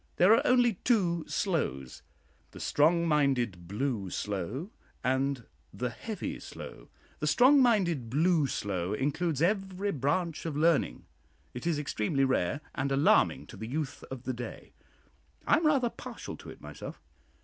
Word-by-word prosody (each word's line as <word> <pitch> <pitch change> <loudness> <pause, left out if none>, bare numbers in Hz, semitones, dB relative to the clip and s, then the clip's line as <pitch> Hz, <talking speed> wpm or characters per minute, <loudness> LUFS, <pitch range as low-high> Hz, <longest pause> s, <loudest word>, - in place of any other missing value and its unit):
There 185 +5 +6
are 230 - +5
only 245 -5 +4
two 175 -9 +2
slows 70 - -2 0.5
the - - -12
"strong 170 +3 +3
minded 125 - +1
blue 105 -1 -2
slow," 105 - -4 0.3
and 130 0 0 0.3
the 125 0 -3
"heavy 180 - -5
slow." - - -10 0.3
The 150 - -1
"strong 260 - +6
minded 175 - +2
blue 155 +3 +3
slow" 95 -5 -2
includes 150 +5 0
every 195 +1 0
branch 160 +4 -1
of 150 -3 -3
learning. 165 0 +2 0.5
It 125 +7 -5
is 165 -3 +1
extremely 135 -1 0
rare, 130 0 +1
and 135 0 -2
alarming 135 +2 +3
to - - -12
the 110 - -6
youth 145 +2 -4
of 130 -2 -7
the 130 - -2
day. 120 0 -8 0.7
I - - +5
am 320 -1 +2
rather 265 -6 +2
partial - - -8
to - - -11
it - - -11
myself. - - -8
145 Hz, 150 wpm, -30 LUFS, 125-180 Hz, 0.7 s, There